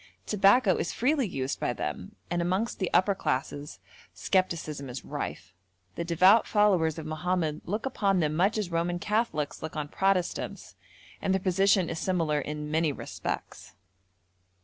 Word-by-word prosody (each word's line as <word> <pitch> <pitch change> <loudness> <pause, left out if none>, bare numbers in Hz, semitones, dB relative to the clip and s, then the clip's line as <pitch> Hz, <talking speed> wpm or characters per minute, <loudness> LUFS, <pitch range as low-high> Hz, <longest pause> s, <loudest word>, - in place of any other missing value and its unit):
Tobacco 200 0 +4
is - - -2
freely 270 0 +1
used 135 -6 -3
by 120 - 0
them, 90 -3 -5 0.2
and 175 0 +1
amongst 185 +6 -1
the 185 - 0
upper 200 +2 +4
classes 145 -4 -3 0.4
scepticism 160 -7 -1
is 125 +2 -7
rife. 90 +2 -5 0.4
The 170 - -3
devout 185 +6 +5
followers 185 -7 +3
of 160 - -6
Mohammed 155 0 -1
look 210 +7 -3
upon 200 -7 +1
them 155 -2 +1
much 195 +6 +2
as 200 -5 -2
Roman 170 +1 0
Catholics 210 -7 -1
look 160 +1 -6
on 150 -1 -3
Protestants, 190 0 -1 0.5
and 190 - +1
their - - +1
position 190 0 +3
is 165 - -4
similar 165 -5 0
in 150 +1 -5
many 160 -1 +2
respects. - - -6
175 Hz, 150 wpm, -28 LUFS, 155-195 Hz, 0.5 s, devout